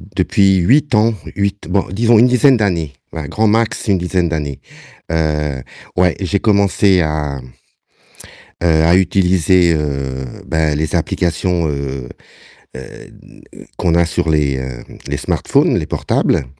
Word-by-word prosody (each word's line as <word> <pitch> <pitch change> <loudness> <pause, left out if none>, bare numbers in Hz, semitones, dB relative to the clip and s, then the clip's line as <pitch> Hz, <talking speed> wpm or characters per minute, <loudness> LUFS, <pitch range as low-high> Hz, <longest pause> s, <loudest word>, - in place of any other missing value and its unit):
depuis 95 +1 +2
8 130 - +2
ans, 110 +2 +3 0.2
8 100 0 -2
bon, 95 +1 +1
disons 115 +3 +3
une 115 - +6
dizaine 125 +1 +4
d'années, 85 -9 -1 0.2
voilà, 80 -3 -6
grand 110 +9 -1
max 115 +2 0
une 95 -3 +2
dizaine 90 -1 -1
d'années, 75 -4 -4 0.5
heu, 75 -4 -1 0.3
ouais, 90 -1 +2
j'ai 100 +2 0
commencé 100 -2 +2
à, 75 -3 -2 1.3
heu, - - +3 0.2
à 85 +2 +4
utiliser, 90 -2 +2
heu, 70 -3 -3 0.2
bah, 80 -2 0
les 75 +2 -1
applications, 85 0 -1
heu, 70 -3 -4 0.7
heu, - - -7
n - - -14 0.3
qu'on 85 -2 +1
a 85 - +4
sur 80 0 -1
les, 70 -3 +1
heu, 65 -2 -7 0.2
les - - -2
smartphones, - - +1
les - - -4
portables - - 0
85 Hz, 140 wpm, -16 LUFS, 75-100 Hz, 1.3 s, une